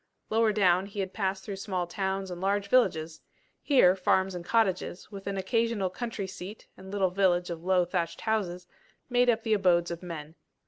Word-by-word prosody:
Lower 225 0 +3
down 190 -2 +3
he 205 0 -8
had 190 -1 -3
passed 195 -2 -2
through 200 -2 -6
small 185 -2 -2
towns 190 +1 -3
and 175 0 -6
large 200 +1 0
villages: 165 -10 +2 0.4
here, 220 -11 +5
farms 190 0 +1
and 175 -1 -6
cottages, 195 -2 0
with 195 -1 -9
an 200 -1 -2
occasional 225 -1 0
country 225 +1 -4
seat 190 +2 -9
and 190 0 -12
little 195 -2 +1
village 180 -2 +2
of 165 -1 -6
low 185 -1 +3
thatched 170 -1 -2
houses, 185 -5 -1 0.5
made 245 0 +4
up 225 - +2
the 220 - +1
abodes 180 -4 +3
of 170 - -5
men. 160 -4 -7
190 Hz, 185 wpm, -28 LUFS, 180-205 Hz, 0.5 s, here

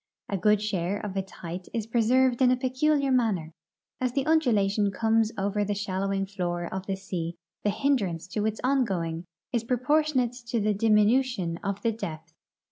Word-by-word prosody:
A 200 - -1
good 210 +2 +3
share 195 -2 -1
of 200 -2 -5
its 190 -1 -3
height 175 +1 -7
is 225 -2 -1
preserved 245 +3 +2
in 255 - +6
a 255 - +3
peculiar 275 +2 +1
manner: 205 -11 +1 0.5
as 255 -1 -1
the 275 0 0
undulation 215 -10 +3
comes 225 +2 +2
over 200 +1 0
the 205 0 -1
shallowing 195 0 -1
floor 175 -3 -3
of 190 0 -5
the 195 - -1
sea 175 -3 -4 0.3
the 210 - +2
hindrance 200 - 0
to 210 +2 -1
its 220 0 -3
ongoing 190 -11 0 0.3
is 235 -2 +1
proportionate 255 +1 +1
to 235 -1 0
the 210 0 +1
dimi 210 0 +4
nution 215 -8 +1
of 200 0 -3
the 230 - +2
depth. 160 -7 -7
210 Hz, 175 wpm, -27 LUFS, 190-250 Hz, 0.5 s, in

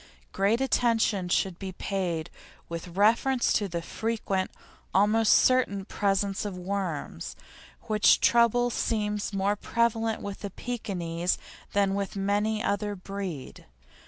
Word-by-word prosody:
Great 200 +4 +2
attention 225 -7 +1
should 180 0 0
be 190 -1 -5
paid 180 -5 -2 0.4
with 170 +1 -7
reference 235 +5 +3
to 205 - +1
the 170 -2 -4
frequent 205 -3 -2 0.5
almost 210 +3 +4
certain 225 -7 +4
presence 195 -1 0
of 200 -3 -4
worms, 180 - -4 0.5
which 215 -1 +4
trouble 240 +1 +4
seems 210 -3 -1
more 200 +1 +1
prevalent 225 0 0
with 200 -1 -6
Pekinese 180 -8 -2 0.4
than 200 -1 +2
with 200 0 -3
any 205 +2 0
other 205 0 -1
breed. 190 -6 -6
200 Hz, 115 wpm, -28 LUFS, 190-220 Hz, 0.5 s, almost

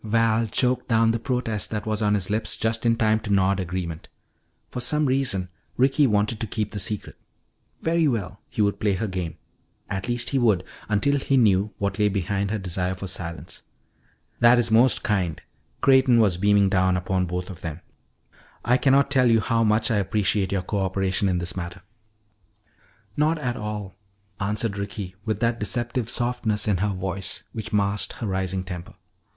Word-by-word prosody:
Val 115 +1 +2
choked 125 +4 0
down 115 -1 +3
the 115 - -1
protest 115 -4 -2
that 105 -1 -4
was 110 0 -2
on 105 -1 +3
his 100 -1 -2
lips 110 +1 -1
just 110 +1 0
in 115 - +4
time 110 -2 +2
to 110 -2 -5
nod 100 0 +3
agreement. 90 -3 -4 0.6
For - - -4
some 150 +5 +1
reason 130 -9 0 0.3
Ricky 135 +3 +4
wanted 105 0 +1
to 115 - -2
keep 105 +1 -3
the 105 - -4
secret. 100 +2 -4 0.7
Very 165 -1 +2
well, 105 -5 -2
he 105 - 0
would 100 0 0
play 105 -2 +1
her 100 +4 -2
game. 90 -4 -4 0.5
At 95 +4 -3
least 120 0 -1
he 135 - +2
would 105 -7 +3 0.3
until 140 +7 +2
he 135 0 +1
knew 105 -3 +3
what 100 +2 -2
lay 105 0 +4
behind 100 0 -1
her 110 - -1
desire 90 -1 -2
for 95 - -7
silence. 85 -3 -5 0.8
"That 120 +1 +6
is 120 -2 +1
most 120 +3 +4
kind." 90 -7 0 0.4
Creighton 130 -2 +5
was 100 -6 +3
beaming 100 0 +3
upon 95 0 +1
both 90 +2 -4
of 90 -1 -11
them. 80 0 -6 0.8
"I 125 +1 +4
cannot 140 +1 +3
tell 130 -3 +4
you 115 -1 +5
how 115 +2 +1
much 110 +1 +2
I 110 - +2
appreciate 100 0 0
your 95 -2 0
coöperation 95 0 0
in 90 - +1
this 85 0 -3
matter 85 0 -6 0.7
" - - -44 0.5
"Not 155 +2 +2
at 125 -5 -2
all," 105 -3 -5 0.5
answered 105 +1 -1
Ricky 100 -2 -5
with 110 -2 -2
that 115 0 +1
deceptive 120 +2 -1
softness 120 -4 0
in 100 -3 +2
her 105 +3 0
voice 95 0 -4
which 110 -3 -6
masked 100 0 0
her - - -6
rising 95 -1 -2
temper. 90 -2 -8
105 Hz, 180 wpm, -24 LUFS, 95-115 Hz, 0.8 s, That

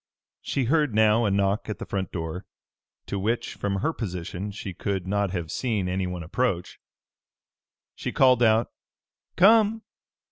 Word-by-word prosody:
She 135 - -1
heard 145 -2 +1
now 110 +1 +4
a - - +2
knock 100 +2 0
at 105 - -3
the - - -6
front 95 -2 -3
door, 80 +1 -4 0.6
to 100 - -3
which, 115 +4 -1
from 100 -1 -2
her 160 - 0
position, 90 - -5
she 100 -1 -6
could 95 0 -3
not 100 +1 0
have 85 -4 -4
seen 110 -7 -1
anyone 90 -1 -2
approach. 90 0 -2 1.1
She - - -5
called 130 -2 +4
out, 110 0 +3 0.6
"Come!" 220 +3 +5
100 Hz, 145 wpm, -26 LUFS, 95-120 Hz, 1.1 s, Come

